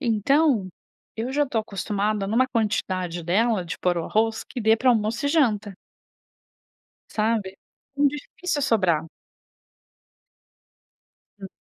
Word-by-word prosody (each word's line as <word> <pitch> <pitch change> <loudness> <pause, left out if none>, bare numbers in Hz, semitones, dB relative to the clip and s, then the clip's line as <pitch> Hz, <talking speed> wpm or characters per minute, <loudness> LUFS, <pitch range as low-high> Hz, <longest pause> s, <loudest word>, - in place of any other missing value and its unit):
Então, 245 -2 +2 0.5
eu 235 +4 -3
já 290 +1 +2
tô 245 -4 -1
acostumada 205 0 -2
numa 235 +6 +2
quantidade 185 -7 -1
dela 205 +4 +1
de 165 - -5
pôr 175 -1 +1
o 165 - -3
arroz, 220 +1 0
que - - -7
dê 220 +1 +4
para 255 +3 +1
almoço 230 +3 0
e - - +2
janta 215 - +1 1.4
sabe, 215 -3 -1 0.4
muito 285 0 +3
difícil 295 0 -4
sobrar. 185 - +1 2.3
Hum. 195 - -7
220 Hz, 120 wpm, -24 LUFS, 195-250 Hz, 2.3 s, dê